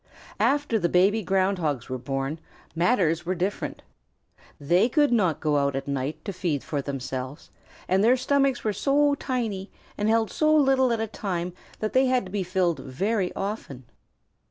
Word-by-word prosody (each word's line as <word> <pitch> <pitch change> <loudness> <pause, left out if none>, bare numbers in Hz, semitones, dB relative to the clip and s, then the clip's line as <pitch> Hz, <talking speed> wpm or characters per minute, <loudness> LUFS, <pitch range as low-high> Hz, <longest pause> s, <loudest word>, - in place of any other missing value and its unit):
After 285 -5 +2
the 175 - +1
baby 195 +6 +3
Ground 195 -1 +1
Hogs 145 -8 -2
were 130 0 -4
born, 135 +4 -3 0.4
matters 170 -3 +2
were 180 +2 -2
different. 185 +3 -3 0.8
They 175 - +3
could 290 +1 +3
not 185 -10 +2
go 150 -2 +1
out 140 -1 +1
at 135 - -4
night 140 +3 -3
to 200 - -3
feed 165 -6 -2
for 145 -2 -2
themselves, 130 +1 -5 0.4
and 190 +2 +2
their 245 +4 +5
stomachs 275 0 +1
were 215 - 0
so 285 +7 +2
tiny 230 -8 -3 0.3
and 210 +1 +1
held 225 -1 +2
so 310 0 +3
little 270 -3 +4
at 230 - 0
a 225 - 0
time 180 -5 -4 0.3
that 215 - -2
they 260 +1 +4
had 255 -4 +1
to 185 - -10
be 205 -1 -1
filled 180 -2 0
very 190 - -1
often. 195 - -5
190 Hz, 175 wpm, -25 LUFS, 155-230 Hz, 0.8 s, their